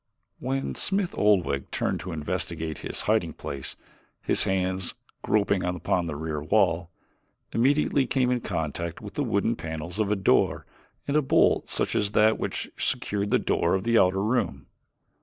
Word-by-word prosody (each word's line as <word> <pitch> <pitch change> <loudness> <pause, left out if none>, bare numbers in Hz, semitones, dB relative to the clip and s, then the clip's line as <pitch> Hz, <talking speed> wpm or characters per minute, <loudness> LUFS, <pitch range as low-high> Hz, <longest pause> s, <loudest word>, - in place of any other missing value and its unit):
When 135 +1 -2
Smith 195 -2 -1
Oldwick 90 -10 +2
turned - - -1
to 90 - -6
investigate 80 0 -3
his - - -2
hiding 105 -7 +1
place, 70 -2 -6 0.5
his - - +4
hands, 95 -1 -1 0.3
groping 100 -2 +1
upon 90 0 -1
the 75 - -4
rear 75 0 -3
wall, 85 0 +2 0.6
immediately 135 +2 +2
came 125 -1 +1
in 125 -1 0
contact 85 -3 -3
with - - -9
the - - -1
wooden - - +1
panels 80 +4 -6
of 105 -2 +1
a - - +3
door 95 -2 +2 0.4
and 140 - 0
a 150 - +5
bolt 135 - +3
such - - +1
as 105 0 0
that 110 +1 +4
which - - -3
secured 100 0 -1
the - - +4
door 85 - +1
of 95 - -2
the 115 0 +4
outer 95 +2 +3
room. 115 +4 -1
95 Hz, 160 wpm, -26 LUFS, 80-110 Hz, 0.6 s, a